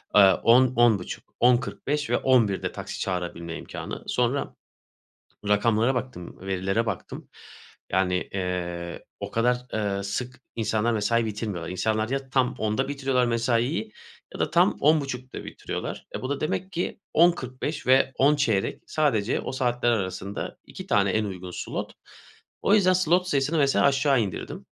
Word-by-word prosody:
eee, 105 Hz, -, +9 dB, 0.2 s
10 125 Hz, +2 st, +5 dB
10.30 115 Hz, -6 st, +2 dB, 0.2 s
10.45 135 Hz, +4 st, +1 dB
ve -, -, +3 dB
11'de 115 Hz, -7 st, +2 dB
taksi -, -, -7 dB
çağırabilme 85 Hz, -2 st, -3 dB
imkânı. -, -, -7 dB
Sonra 125 Hz, +3 st, 0 dB, 0.9 s
rakamlara 110 Hz, +4 st, +3 dB
baktım, 125 Hz, -8 st, -5 dB
verilere 95 Hz, +4 st, -1 dB
baktım. 105 Hz, -5 st, -5 dB, 0.6 s
Yani, 90 Hz, -1 st, +1 dB
eee, 85 Hz, -2 st, -4 dB
o -, -, -5 dB
kadar, 125 Hz, +2 st, +2 dB, 0.2 s
eee, 100 Hz, -2 st, -1 dB
sık 125 Hz, +6 st, -4 dB
insanlar 110 Hz, +1 st, 0 dB
mesai 115 Hz, +2 st, +1 dB
bitirmiyorlar. 105 Hz, -6 st, -4 dB
İnsanlar 110 Hz, +4 st, 0 dB
ya 135 Hz, 0 st, -3 dB
tam 130 Hz, -1 st, +1 dB
10'da 110 Hz, +3 st, 0 dB
bitiriyorlar 135 Hz, -3 st, +1 dB
mesaiyi 115 Hz, -1 st, 0 dB, 0.4 s
ya -, -, -8 dB
da -, -, +1 dB
tam -, -, +4 dB
10.30'da 135 Hz, -4 st, 0 dB
bitiriyorlar. -, -, -6 dB
E, -, -, -4 dB
bu 130 Hz, -, -4 dB
da 140 Hz, 0 st, -1 dB
demek 185 Hz, +5 st, -2 dB
ki 175 Hz, +2 st, -3 dB
10.45 150 Hz, -4 st, +1 dB
ve 135 Hz, +1 st, +5 dB
10.15 135 Hz, -8 st, +2 dB
sadece 120 Hz, -9 st, +1 dB
o -, -, -4 dB
saatler 125 Hz, -2 st, 0 dB
arasında 100 Hz, -2 st, -3 dB
2 -, -, -10 dB
tane 100 Hz, -1 st, +3 dB
en 110 Hz, +2 st, +1 dB
uygun 90 Hz, -2 st, -6 dB
slot. -, -, -5 dB, 0.7 s
O 205 Hz, -, +4 dB
yüzden 185 Hz, -3 st, +4 dB
slot 180 Hz, 0 st, +2 dB
sayısını 145 Hz, 0 st, +1 dB
mesela 140 Hz, -2 st, +3 dB
aşağı 135 Hz, -2 st, +3 dB
indirdim. 95 Hz, -5 st, -5 dB
120 Hz, 140 wpm, -26 LUFS, 100-135 Hz, 0.9 s, eee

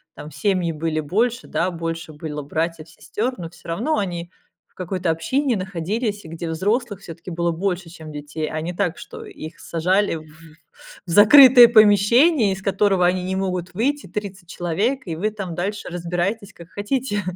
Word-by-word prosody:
там 150 Hz, -, -9 dB
семьи 175 Hz, +3 st, 0 dB
были 155 Hz, 0 st, -2 dB
больше, 225 Hz, -, -1 dB
да, 180 Hz, +2 st, -1 dB
больше 165 Hz, -1 st, -5 dB
было 150 Hz, 0 st, -6 dB
братьев, 160 Hz, +2 st, -3 dB
сестёр, 225 Hz, +9 st, -4 dB
но 170 Hz, -2 st, -6 dB
всё 175 Hz, -, -14 dB
равно 240 Hz, -, 0 dB
они 175 Hz, -3 st, -4 dB, 0.4 s
в -, -, -40 dB
какой-то 185 Hz, -1 st, -3 dB
общине 260 Hz, -, 0 dB
находились, 200 Hz, +4 st, -3 dB
и -, -, -9 dB
где 165 Hz, +1 st, -5 dB
взрослых 205 Hz, +5 st, -1 dB
всё-таки 170 Hz, +1 st, -9 dB
было 170 Hz, 0 st, 0 dB
больше, 180 Hz, 0 st, -2 dB
чем 160 Hz, -2 st, -11 dB
детей. 150 Hz, +1 st, -5 dB
А 155 Hz, -, -3 dB
не 170 Hz, +3 st, -4 dB
так, 180 Hz, -2 st, -1 dB
что 455 Hz, -1 st, -10 dB
их 165 Hz, -, -10 dB
сажали 185 Hz, +4 st, +1 dB
в 155 Hz, -1 st, -8 dB, 0.8 s
в -, -, -9 dB
закрытое 245 Hz, -, +9 dB
помещение, 220 Hz, -, +5 dB
из 190 Hz, -, -8 dB
которого 195 Hz, -1 st, +2 dB
они 180 Hz, 0 st, 0 dB
не 190 Hz, +1 st, -2 dB
могут 185 Hz, -2 st, -3 dB
выйти, 275 Hz, +9 st, -1 dB
30 190 Hz, -1 st, -6 dB
человек, 200 Hz, +12 st, -1 dB
и 165 Hz, -, -3 dB
вы 210 Hz, +7 st, -1 dB
там 195 Hz, -5 st, -6 dB
дальше 200 Hz, +4 st, -3 dB
разбирайтесь, 175 Hz, +4 st, -3 dB
как 170 Hz, 0 st, -14 dB
хотите. 205 Hz, 0 st, -2 dB
185 Hz, 175 wpm, -22 LUFS, 165-210 Hz, 0.8 s, закрытое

